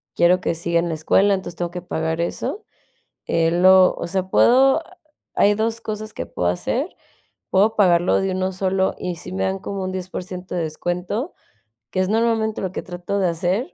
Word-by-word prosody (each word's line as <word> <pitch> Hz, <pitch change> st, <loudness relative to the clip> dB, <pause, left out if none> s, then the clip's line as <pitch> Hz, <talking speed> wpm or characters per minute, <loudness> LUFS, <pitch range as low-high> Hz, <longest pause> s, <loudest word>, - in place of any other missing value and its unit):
quiero 180 Hz, +1 st, +4 dB
que 170 Hz, -, -1 dB
siga 170 Hz, +1 st, 0 dB
en 170 Hz, -, -1 dB
la 160 Hz, -, -2 dB
escuela, 195 Hz, +6 st, +3 dB
entonces 185 Hz, -2 st, -6 dB
tengo 175 Hz, 0 st, -3 dB
que 180 Hz, 0 st, -6 dB
pagar 160 Hz, -2 st, -2 dB
eso. 385 Hz, -, -3 dB, 0.6 s
Eh, 165 Hz, 0 st, +2 dB
lo 185 Hz, +2 st, +6 dB
o -, -, -4 dB
sea, 185 Hz, +1 st, -2 dB
puedo 265 Hz, +5 st, +5 dB, 0.5 s
hay 205 Hz, +1 st, +4 dB
2 225 Hz, +2 st, -1 dB
cosas 215 Hz, -1 st, -5 dB
que -, -, -5 dB
puedo 90 Hz, -, -2 dB
hacer, 90 Hz, -, -2 dB, 0.6 s
puedo 205 Hz, +4 st, +3 dB
pagarlo 175 Hz, -3 st, +3 dB
de 195 Hz, -1 st, -1 dB
1 185 Hz, 0 st, -1 dB
solo, 190 Hz, 0 st, 0 dB
y 180 Hz, -2 st, -4 dB
si 180 Hz, -, -9 dB
me 190 Hz, -, -2 dB
dan 190 Hz, 0 st, -1 dB
como 195 Hz, 0 st, -5 dB
un 185 Hz, -, -3 dB
10% 185 Hz, 0 st, -6 dB
de 170 Hz, -, 0 dB
descuento, 180 Hz, -, -3 dB, 0.6 s
que 185 Hz, -, -2 dB
es 185 Hz, -, +2 dB
normalmente 220 Hz, 0 st, +1 dB
lo 190 Hz, -, -3 dB
que -, -, -5 dB
trato 180 Hz, +2 st, -4 dB
de 190 Hz, -, +2 dB
hacer, 185 Hz, -, -1 dB
185 Hz, 190 wpm, -21 LUFS, 175-205 Hz, 0.6 s, lo